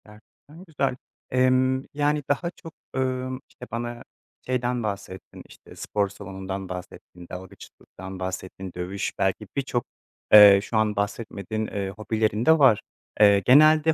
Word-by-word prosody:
Gerçekten 110 Hz, +10 st, -17 dB
güzel. 140 Hz, -5 st, -1 dB, 0.4 s
Emm, 130 Hz, +1 st, +2 dB
yani 145 Hz, 0 st, 0 dB
daha 155 Hz, +5 st, 0 dB
çok, 165 Hz, -3 st, -13 dB, 0.2 s
ımm, 130 Hz, 0 st, -2 dB
işte 125 Hz, -, -12 dB
bana 120 Hz, +1 st, -5 dB, 0.4 s
şeyden 125 Hz, -1 st, -1 dB
bahsettin, 100 Hz, -2 st, -6 dB
işte -, -, -16 dB
spor 100 Hz, -1 st, -1 dB
salonundan 95 Hz, -1 st, -7 dB
bahsettin, 90 Hz, -1 st, -9 dB
dalgıçlıktan 95 Hz, 0 st, -10 dB
bahsettin, 95 Hz, 0 st, -6 dB
dövüş 90 Hz, +3 st, -4 dB
belki 95 Hz, +2 st, 0 dB
birçok, 130 Hz, -4 st, -2 dB, 0.5 s
eee, 100 Hz, -2 st, +10 dB
şu 115 Hz, -, -2 dB
an 110 Hz, -1 st, +1 dB
bahsetmediğin, 105 Hz, +1 st, -3 dB
eee, 100 Hz, -1 st, -4 dB
hobilerin 110 Hz, +2 st, -1 dB
de 160 Hz, 0 st, +5 dB
var. 130 Hz, -7 st, +5 dB, 0.4 s
Eee, 100 Hz, -1 st, +6 dB
genelde 155 Hz, +6 st, +5 dB
110 Hz, 130 wpm, -25 LUFS, 100-130 Hz, 0.5 s, eee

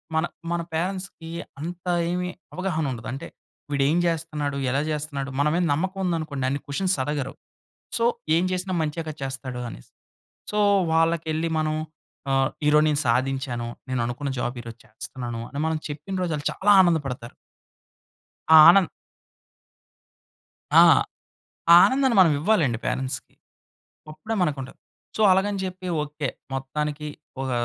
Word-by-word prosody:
మన, 160 Hz, +1 st, +2 dB, 0.3 s
మన 170 Hz, 0 st, 0 dB
పేరెంట్స్‌కి 180 Hz, -1 st, -4 dB, 0.3 s
అంత 175 Hz, +3 st, -6 dB, 0.3 s
ఏమి 180 Hz, 0 st, -2 dB, 0.2 s
అవగాహన 180 Hz, -4 st, -1 dB
ఉండదు. 120 Hz, -2 st, -6 dB
అంటే, 135 Hz, -, -6 dB, 0.4 s
"వీడేం 140 Hz, +3 st, +2 dB
జేస్తున్నాడు. 155 Hz, -4 st, -2 dB
ఎలా 140 Hz, +3 st, +1 dB
జేస్తున్నాడు." 145 Hz, -2 st, -3 dB
మన 145 Hz, -, +3 dB
మీద 180 Hz, -, +2 dB
నమ్మకం 190 Hz, +6 st, -2 dB
ఉందనుకోండి 155 Hz, -6 st, -2 dB
అన్ని 140 Hz, +1 st, -2 dB
క్వెశ్చన్స్ 185 Hz, +7 st, 0 dB
అడగరు. 140 Hz, -1 st, -3 dB, 0.7 s
సో, 230 Hz, -, +1 dB, 0.3 s
ఏం 170 Hz, -, +2 dB
జేసినా 185 Hz, 0 st, -2 dB
మంచేగా 155 Hz, +1 st, -3 dB
చేస్తాడు 130 Hz, -2 st, -5 dB
అనేసి. -, -, -12 dB, 0.6 s
సో, 210 Hz, -, 0 dB, 0.3 s
వాళ్ళకెళ్లి 165 Hz, 0 st, +1 dB
మనం 155 Hz, 0 st, 0 dB, 0.6 s
ఆహ్, 135 Hz, 0 st, +3 dB, 0.2 s
"ఈరోజు 150 Hz, +1 st, +5 dB
నేను 150 Hz, -1 st, +1 dB
సాధించాను. 125 Hz, 0 st, 0 dB, 0.2 s
నేను 130 Hz, -2 st, 0 dB
అనుకున్న 125 Hz, +4 st, -3 dB
జాబ్ 120 Hz, 0 st, -2 dB
ఈరోజు 115 Hz, -1 st, -10 dB
చేస్తున్నాను" 120 Hz, +1 st, -7 dB
అని 140 Hz, -, -6 dB
మనం 160 Hz, 0 st, 0 dB
చెప్పిన 150 Hz, +6 st, -6 dB
రోజు 175 Hz, -3 st, -1 dB
ఆళ్ళు 145 Hz, -1 st, -6 dB
చాలా 205 Hz, +2 st, +2 dB
ఆనందపడతారు. 140 Hz, -9 st, -1 dB, 1.2 s
ఆ -, -, +11 dB
ఆనంద్ 180 Hz, -2 st, +5 dB, 1.9 s
ఆ! -, -, +10 dB, 0.9 s
ఆ -, -, +11 dB
ఆనందాన్ని 265 Hz, -2 st, +2 dB
మనం 165 Hz, -4 st, +6 dB
ఇవ్వాలండి 160 Hz, -, +2 dB
పేరెంట్స్‌కి. 130 Hz, 0 st, -3 dB, 0.8 s
అప్పుడే 155 Hz, +9 st, -5 dB
మనకుంటాది. 140 Hz, -6 st, -2 dB, 0.4 s
సో, -, -, 0 dB
అలాగని 195 Hz, +2 st, +2 dB
జెప్పి 185 Hz, 0 st, -5 dB, 0.2 s
ఓకే. 150 Hz, -1 st, -4 dB, 0.3 s
మొత్తానికి 150 Hz, +3 st, -3 dB, 0.3 s
ఒక 130 Hz, -1 st, -2 dB
150 Hz, 130 wpm, -24 LUFS, 135-175 Hz, 1.9 s, ఆ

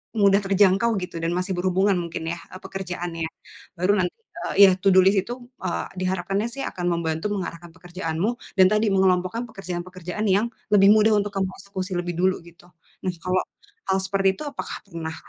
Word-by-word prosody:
mudah 200 Hz, -2 st, +5 dB
terjangkau 195 Hz, +3 st, +3 dB
gitu 180 Hz, -2 st, -7 dB
dan 165 Hz, -, 0 dB
masih 180 Hz, +2 st, -2 dB
berhubungan 185 Hz, +2 st, +2 dB
mungkin 170 Hz, -2 st, -4 dB
ya, 170 Hz, -, -1 dB, 0.2 s
e -, -, -10 dB
pekerjaannya. 175 Hz, -4 st, -4 dB, 0.5 s
Baru 190 Hz, +3 st, +3 dB
nanti, 180 Hz, -1 st, +1 dB, 0.4 s
eee, -, -, -3 dB
ya, -, -, +5 dB
to 195 Hz, -, +3 dB
do 190 Hz, -, +7 dB
list, 195 Hz, +2 st, +5 dB
itu, 240 Hz, -, -5 dB, 0.3 s
eee, 85 Hz, 0 st, -2 dB, 0.2 s
diharapkannya 195 Hz, +3 st, -1 dB
sih 275 Hz, -, -9 dB
akan 180 Hz, -, -5 dB
membantu 165 Hz, +1 st, -1 dB
mengarahkan 175 Hz, -4 st, -5 dB
pekerjaanmu, 175 Hz, +4 st, -3 dB, 0.2 s
dan 185 Hz, -, +8 dB
tadi 215 Hz, +1 st, +2 dB
mengelompokkan 190 Hz, +3 st, +2 dB
pekerjaan-pekerjaan 185 Hz, 0 st, -5 dB
yang, 200 Hz, +3 st, +3 dB, 0.3 s
lebih 195 Hz, -1 st, +7 dB
mudah 215 Hz, 0 st, +5 dB
untuk 205 Hz, 0 st, -1 dB
kamu 190 Hz, -1 st, +1 dB
eksekusi 190 Hz, -1 st, -5 dB
lebih 175 Hz, -1 st, -3 dB
dulu 185 Hz, -1 st, +1 dB
gitu. 170 Hz, +1 st, -17 dB, 0.4 s
Nah 185 Hz, -, 0 dB
kalau, 185 Hz, 0 st, +1 dB, 0.5 s
hal 190 Hz, 0 st, +3 dB
seperti 195 Hz, 0 st, +1 dB
itu -, -, -6 dB
apakah 280 Hz, -, -6 dB
pernah, 160 Hz, -1 st, -5 dB
185 Hz, 175 wpm, -24 LUFS, 175-195 Hz, 0.5 s, dan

